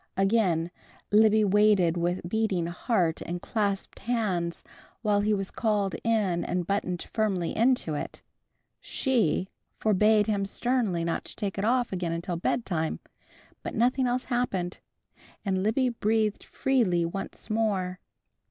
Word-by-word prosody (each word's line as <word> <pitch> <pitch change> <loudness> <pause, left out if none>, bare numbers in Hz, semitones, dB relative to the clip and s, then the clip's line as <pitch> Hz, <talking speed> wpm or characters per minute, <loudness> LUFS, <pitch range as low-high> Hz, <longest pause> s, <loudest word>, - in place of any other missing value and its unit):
Again 190 -5 +2 0.4
Libby 215 0 +5
waited 200 -4 +4
with 175 +1 -1
beating 200 -4 0
heart 170 -1 0
and 175 +1 -4
clasped 200 0 -2
hands 195 -7 -1 0.4
while 210 -2 +3
he 210 +1 +1
was 195 -2 -1
called 210 -4 0
in 210 -7 +1
and 180 -1 -1
buttoned 180 -2 -2
firmly 195 -6 0
into 235 -8 +2
it. 145 - -5 0.6
She 230 - 0 0.3
forbade 210 0 +4
him 205 -2 0
sternly 220 -6 0
not 165 0 -1
to - - -9
take 200 -3 -3
it 200 - 0
off 245 -1 +1
again 170 -2 -2
till 175 +1 -3
bedtime, 170 -4 -1 0.6
but - - -5
nothing 250 +3 +2
else 250 +1 0
happened, 195 -8 -2 0.7
and 190 -1 0
Libby 235 +6 +2
breathed 220 -2 0
freely 210 -11 +1
once 195 +5 -6
more. 195 -5 0
200 Hz, 135 wpm, -27 LUFS, 180-220 Hz, 0.7 s, Libby